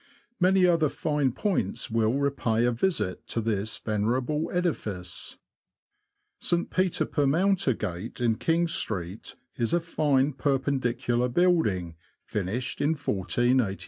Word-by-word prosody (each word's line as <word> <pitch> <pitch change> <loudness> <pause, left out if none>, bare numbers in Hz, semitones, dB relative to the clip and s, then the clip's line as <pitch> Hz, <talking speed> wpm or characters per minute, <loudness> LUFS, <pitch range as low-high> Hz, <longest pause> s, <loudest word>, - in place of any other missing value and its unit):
Many 185 0 +4
other 165 -4 +3
fine 145 -3 0
points 135 - -1
will 110 0 +2
repay 135 -5 +1
a 120 - +3
visit 115 - -1
to - - -2
this 110 -1 -1
venerable 125 +8 -1
edifice. 105 - -3 1.0
St. 175 0 0
Peter 185 -1 +1
per 145 -2 0
Mountergate, 135 - 0
in 115 -2 +1
King 170 +1 +2
Street, 100 - -3 0.2
is 120 +5 0
a 175 - +4
fine 150 -4 +1
Perpendicular 130 -3 0
building, 115 - +1 0.3
finished 110 +6 -3
in 155 +3 +2
i486. 120 -3 0
130 Hz, 115 wpm, -27 LUFS, 110-160 Hz, 1.0 s, Many